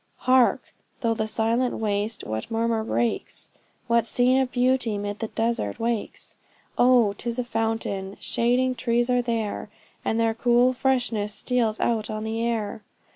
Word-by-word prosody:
Hark! 255 -1 +3 0.3
through 230 -1 +1
the 220 -1 -2
silent 230 +3 0
waste, 210 0 -2
what 110 +1 -4
murmur 225 0 0
breaks? 230 +1 -2 0.4
What 235 -1 +2
scene 255 +3 +3
of 255 -1 -2
beauty 250 -3 +1
'mid 205 +1 -4
the 225 - -2
desert 225 - -2
wakes? 230 -2 -3 0.4
Oh! 245 -4 +4
'tis 235 +3 -4
a 250 - 0
fountain! 225 -4 -2
shading 250 +2 +1
trees 240 0 0
are 250 0 +3
there. 225 -4 -3 0.3
And 225 - 0
their 225 -1 +2
cool 245 +2 +3
freshness 245 -5 0
steals 235 -4 0
out 225 -2 0
on 215 0 -4
the 220 +1 -2
air! 220 -3 -2
230 Hz, 150 wpm, -25 LUFS, 220-245 Hz, 0.4 s, Oh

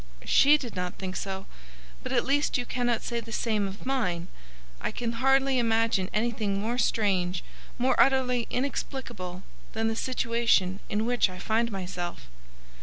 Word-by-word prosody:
"She 290 +2 +6
did 245 -6 -7
not 180 -1 -3
think 185 -1 -5
so. 195 -1 -4 0.6
But - - -5
at - - +2
least 285 +2 +2
you 245 - -2
cannot 245 -3 0
say 235 -1 -2
the 230 0 -9
same 215 -3 0
of 195 +4 -9
mine. 185 -10 -1 0.5
I - - -1
can 235 -1 -3
hardly 270 0 +4
imagine 225 -5 +2
anything 215 -3 0
more 235 +4 -1
strange, 190 -6 +1 0.3
more 255 +2 +3
utterly 250 -2 +3
inexplicable, 240 -8 -4 0.3
than 225 0 0
the 225 - -2
situation 230 -6 +1
in 210 +2 0
which 245 -4 +3
I 185 - -8
find 225 +5 0
myself." 180 -2 -5
225 Hz, 155 wpm, -28 LUFS, 195-245 Hz, 0.6 s, She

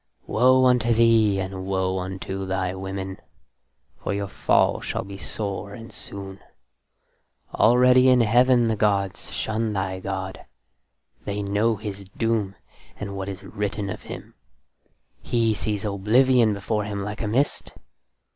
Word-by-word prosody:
Woe 130 +3 +4
unto 120 -2 +3
thee, 110 -3 +4
and 95 0 -5
woe 95 -1 0
unto 95 +1 -5
thy 95 -1 -1
women, 95 0 -5 0.9
for 100 - -1
your 100 0 -2
fall - - +2
shall - - -3
be 100 0 -9
sore 100 -1 -4
and 115 -1 -11
soon. 100 -1 -7 1.1
Already 125 +2 +5
in 125 -1 +5
Heaven 120 +2 +4
the 110 - +1
gods 100 -2 0
shun 110 0 -1
thy 95 -1 -2
god: 95 0 -5 0.8
they 100 0 -3
know 105 +3 +1
his 100 -1 -7
doom 110 -4 0 0.4
and 100 -1 -5
what 95 0 -4
is 95 0 -7
written 100 0 -3
of - - -7
him: - - -9 0.9
he 115 -2 +1
sees 105 -1 -3
oblivion 110 +3 +3
before 105 +1 -2
him 100 -1 -4
like 105 +1 -5
a 110 - -1
mist. 130 +7 0
100 Hz, 135 wpm, -24 LUFS, 95-115 Hz, 1.1 s, Already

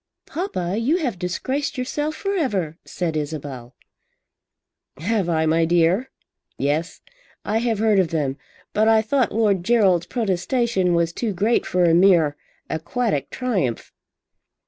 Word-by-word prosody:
"Papa, 195 - -3
you 275 +9 +2
have 250 - -2
disgraced 260 +11 -2
yourself 295 +4 -2
for 395 +3 -2
ever," 195 - -1
said 170 -3 -3
Isabel. 145 -5 -5 1.2
"Have 190 +3 -1
I, 160 -1 +1
my 165 +1 +3
dear? 175 +8 +2 0.5
Yes, 150 +5 -1 0.4
I 215 +2 +1
have 230 -2 0
heard 215 -1 +3
of 185 - +3
them. 150 -5 -1 0.4
But 215 +1 +3
I 220 -1 +5
thought 255 +2 +1
Lord 205 -5 +1
Gerald's 195 -6 +3
protestation 195 -2 0
was 170 0 +1
too 225 +1 -2
great 210 +6 +1
for 180 -1 +1
a 170 -1 +4
mere 170 -5 +4 0.3
aquatic 160 - -2
triumph." 195 - -2
190 Hz, 135 wpm, -22 LUFS, 165-235 Hz, 1.2 s, I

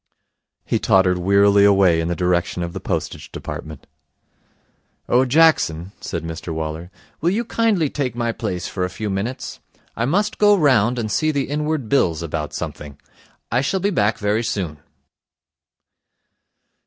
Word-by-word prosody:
He - - 0
tottered 95 -2 +3
wearily 100 +2 +4
away 95 -5 +4
in 80 - -2
the 85 - -1
direction 90 -1 0
of 85 0 -5
the - - -5
Postage - - -4
Department. - - -7 1.2
'Oh, 125 +2 +3
Jackson,' 125 - +3
said 85 -3 -4
Mr 80 +1 -6
Waller, 80 +2 -4 0.3
'will 165 - +2
you 225 +6 -1
kindly 220 -9 +1
take 135 -4 -3
my 120 -1 -1
place 95 -7 -4
for 95 - -3
a 90 - -1
few 105 +2 -4
minutes? 115 +7 -4 0.4
I 115 - -1
must 205 +10 0
go 205 -1 +5
round 125 - +3
and 110 -3 -2
see 155 - +1
the 140 -3 0
Inward 150 -3 -2
Bills 85 - +1
about 75 -2 -4
something. 70 -2 -7 0.5
I 120 +2 +2
shall 190 +8 0
be 200 +3 0
back 105 - +1
very 105 +2 0
soon.' 85 -9 -3
105 Hz, 155 wpm, -21 LUFS, 90-140 Hz, 1.2 s, go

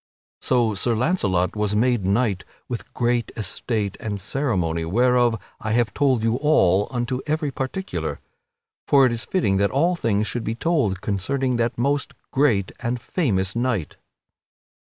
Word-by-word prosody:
So 120 -4 +2
Sir 115 +4 0
Launcelot 105 - +1
was 105 -1 0
made 120 -2 +2
knight 100 -2 +1 0.2
with 120 -3 -6
great 120 -1 0
estate 105 0 -2
and 105 -2 -4
ceremony, 95 - -1
whereof 120 +5 +2 0.2
I 110 -1 -2
have 115 -3 +1
told 130 -5 +2
you 115 +1 +2
all, 105 - +3
unto 125 +1 -2
every 150 -1 0
particular. 135 +10 -4 0.7
For 140 -2 +6
it 125 - +2
is 115 -1 -3
fitting 105 - +1
that 100 +1 +2
all 170 +7 +2
things 110 -9 0
should 120 +1 -3
be 110 - -2
so - - -26
told 130 - +1
concerning 125 +6 -1
that 115 0 0
most 140 +3 0 0.2
great 120 -9 +2
and 120 0 -2
famous 100 - -1
knight. 120 -9 -1
120 Hz, 155 wpm, -23 LUFS, 100-130 Hz, 0.7 s, For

